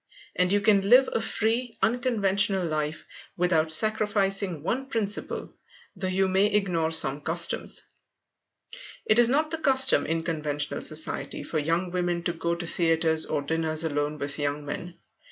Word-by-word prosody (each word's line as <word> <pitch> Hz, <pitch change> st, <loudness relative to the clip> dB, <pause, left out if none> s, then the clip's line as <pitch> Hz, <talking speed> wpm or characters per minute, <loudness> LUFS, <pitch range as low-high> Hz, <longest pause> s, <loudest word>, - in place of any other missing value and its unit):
And 180 Hz, 0 st, +1 dB
you 205 Hz, 0 st, +2 dB
can 200 Hz, -2 st, +2 dB
live 255 Hz, +2 st, +6 dB
a -, -, 0 dB
free, 225 Hz, +2 st, -2 dB
unconventional 200 Hz, -6 st, +1 dB
life 155 Hz, -1 st, -3 dB, 0.3 s
without 165 Hz, -3 st, +1 dB
sacrificing 200 Hz, -3 st, +1 dB
one 260 Hz, +9 st, -2 dB
principle, 215 Hz, -5 st, -4 dB, 0.4 s
though 185 Hz, 0 st, -4 dB
you 190 Hz, +1 st, +1 dB
may 190 Hz, +2 st, +2 dB
ignore 185 Hz, -6 st, 0 dB
some 150 Hz, -3 st, 0 dB
customs. 170 Hz, +3 st, 0 dB, 1.2 s
It 215 Hz, -, +3 dB
is 240 Hz, -1 st, +5 dB
not 305 Hz, +4 st, +1 dB
the 325 Hz, -, -3 dB
custom 265 Hz, -, +6 dB
in 165 Hz, +1 st, -2 dB
conventional 150 Hz, -3 st, -3 dB
society 155 Hz, 0 st, -2 dB
for 155 Hz, -, -3 dB
young 165 Hz, +4 st, -1 dB
women 175 Hz, -1 st, -2 dB
to 175 Hz, -, -1 dB
go 170 Hz, 0 st, -2 dB
to 175 Hz, 0 st, -6 dB
theatres 165 Hz, -1 st, +2 dB
or 145 Hz, -2 st, -2 dB
dinners 160 Hz, +1 st, -1 dB
alone 145 Hz, -1 st, -2 dB
with 140 Hz, 0 st, -3 dB
young 145 Hz, 0 st, -3 dB
men. 170 Hz, +4 st, -7 dB
175 Hz, 155 wpm, -26 LUFS, 160-210 Hz, 1.2 s, live